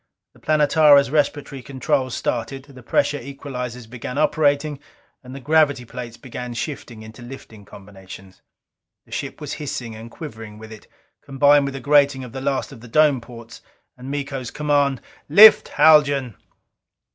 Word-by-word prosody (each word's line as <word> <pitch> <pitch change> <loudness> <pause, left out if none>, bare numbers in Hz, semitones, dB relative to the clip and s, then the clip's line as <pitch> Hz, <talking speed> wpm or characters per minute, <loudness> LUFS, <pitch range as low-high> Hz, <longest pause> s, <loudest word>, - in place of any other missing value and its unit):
The - - -22
Planetara's 150 -2 +4
respiratory 145 -2 -1
controls 130 0 -2
started; 125 +3 -3
the 135 -3 -15
pressure 145 +4 0
equalizers 125 -2 -7
began 125 +2 -7
operating; 150 -1 +1 0.4
and 130 +1 -11
the - - -7
gravity 145 -2 +2
plates 120 0 -9
began 125 -1 -8
shifting 115 -4 -6
into 110 +2 -13
lifting 120 -4 -12
combinations. 95 -1 -14 0.6
The - - -24
ship - - -5
was - - -6
hissing 120 -6 -5
and 110 +1 -10
quivering 110 -7 -10
with 110 0 -12
it, 110 - -13 0.3
combined 145 +1 +3
with 140 0 -5
the - - -5
grating 140 -2 +2
of 125 - -10
the 130 +1 -7
last 135 +1 -2
of 130 -5 -13
the 120 - -12
dome 145 0 +3
ports. 115 -1 -13 0.3
And 125 +1 -10
Miko's 140 -3 -4
command: 145 -2 0 0.3
"Lift, 210 +8 +8
Haljan!" 145 -7 +3
135 Hz, 150 wpm, -21 LUFS, 120-145 Hz, 0.6 s, Lift